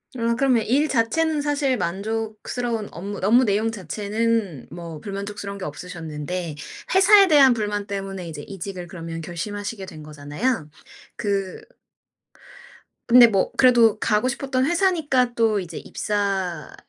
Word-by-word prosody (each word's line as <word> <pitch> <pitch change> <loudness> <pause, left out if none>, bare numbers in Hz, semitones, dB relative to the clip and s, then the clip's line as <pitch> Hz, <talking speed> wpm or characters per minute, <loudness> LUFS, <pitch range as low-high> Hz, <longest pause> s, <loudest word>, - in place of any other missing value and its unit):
아 230 -1 0
그러면 255 -4 +3
일 285 +6 +2
자체는 300 +6 +1
사실 285 -2 0
만족스러운 220 +4 -3
업무 200 +4 -6
업무 240 +5 +5
내용 215 +2 +1
자체는 210 - -2
뭐 170 -1 -8
불만족스러운 200 +1 -6
게 195 - -6
없으셨는데 160 0 -5 0.4
회사에 390 +1 +7
대한 280 -6 +6
불만 205 -2 -2
때문에 195 -2 -5
이제 150 -2 -7
이직을 185 -1 -7
그러면 165 -2 -7
결심하시게 195 +4 -5
된 155 -5 -10
거잖아요. 150 - -3 0.5
그 195 -2 -2 1.4
근데 245 0 +9
뭐 195 -4 +1
그래도 235 -4 +5
가고 215 +2 +1
싶었던 265 0 -1
회사니까 320 -8 +1
또 220 -3 +2
이제 170 -3 -7
입사를 195 -6 -2
205 Hz, 310 characters per minute, -23 LUFS, 180-245 Hz, 1.4 s, 근데